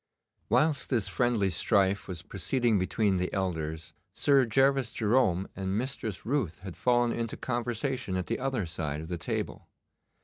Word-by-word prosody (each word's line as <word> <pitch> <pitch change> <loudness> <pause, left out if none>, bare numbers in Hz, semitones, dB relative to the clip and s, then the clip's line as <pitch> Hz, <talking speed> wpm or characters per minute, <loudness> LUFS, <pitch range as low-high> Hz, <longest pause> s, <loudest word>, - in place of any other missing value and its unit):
Whilst 150 -3 +2
this 115 -7 +1
friendly 115 -6 +1
strife 100 -1 +2
was 85 -3 -6
proceeding 120 -2 +1
between 95 +1 +1
the 90 0 -1
elders, 80 -5 -3 0.2
Sir 135 -3 +4
Gervas 135 0 +3
Jerome 105 -5 +2
and 95 0 -2
Mistress 115 -5 -3
Ruth 120 - 0
had 95 -3 -7
fallen 120 -1 +2
into 115 -1 -3
conversation 120 -2 -2
at 90 -1 -1
the 115 - -2
other 130 -6 -1
side 80 -3 -3
of 80 - -8
the 85 -2 -3
table. - - -4
110 Hz, 150 wpm, -29 LUFS, 95-125 Hz, 0.2 s, Sir